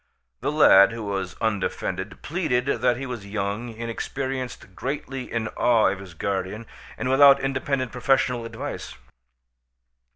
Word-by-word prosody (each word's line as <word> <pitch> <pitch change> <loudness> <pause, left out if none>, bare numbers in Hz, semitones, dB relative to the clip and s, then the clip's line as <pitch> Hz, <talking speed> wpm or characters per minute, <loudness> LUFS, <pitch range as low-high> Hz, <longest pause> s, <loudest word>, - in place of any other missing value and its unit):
The - - -1
lad, 115 -9 +7
who 115 -1 -5
was 95 -4 -3
undefended, 100 -2 -2
pleaded 150 -7 0
that 125 -3 +1
he 135 - -5
was 120 -6 -6
young, 100 +3 -3
inexperienced, 120 0 -5
greatly 135 +1 -5
in 115 -1 -1
awe 115 -4 +3
of 95 0 -3
his 95 -3 -11
guardian, 100 +5 -3 0.3
and 130 - -3
without 140 +1 +7
independent 135 -1 -1
professional 125 -1 +1
advice. 115 0 -6
115 Hz, 130 wpm, -24 LUFS, 100-135 Hz, 0.3 s, lad